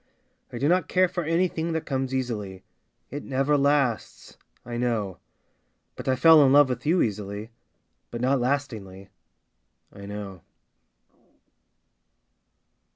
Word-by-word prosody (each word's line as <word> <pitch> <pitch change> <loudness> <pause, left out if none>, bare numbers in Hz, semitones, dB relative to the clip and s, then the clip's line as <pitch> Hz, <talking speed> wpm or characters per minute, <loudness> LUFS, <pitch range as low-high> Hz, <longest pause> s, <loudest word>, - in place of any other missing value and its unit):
I - - -6
do 135 +4 0
not 180 +3 +2
care 185 0 +3
for 175 0 -4
anything 165 0 0
that 160 - -3
comes 135 -1 -2
easily, 110 -8 -4 0.5
It 145 - -5
never 135 +2 0
lasts 140 -4 0 0.2
— - - -39
I 120 0 -6
know. 115 -6 -2 0.8
But - - -9
I 130 - +3
fell 155 +3 +7
in 135 - +4
love 145 -1 +6
with 125 +3 -4
you 175 +3 +3
easily, 105 +1 -4 0.6
But, 120 - -6
not 130 +1 +1
lastingly 110 -8 -3 0.4
— - - -39
I 100 0 -10
know. 100 -3 -7
130 Hz, 135 wpm, -25 LUFS, 105-145 Hz, 0.8 s, fell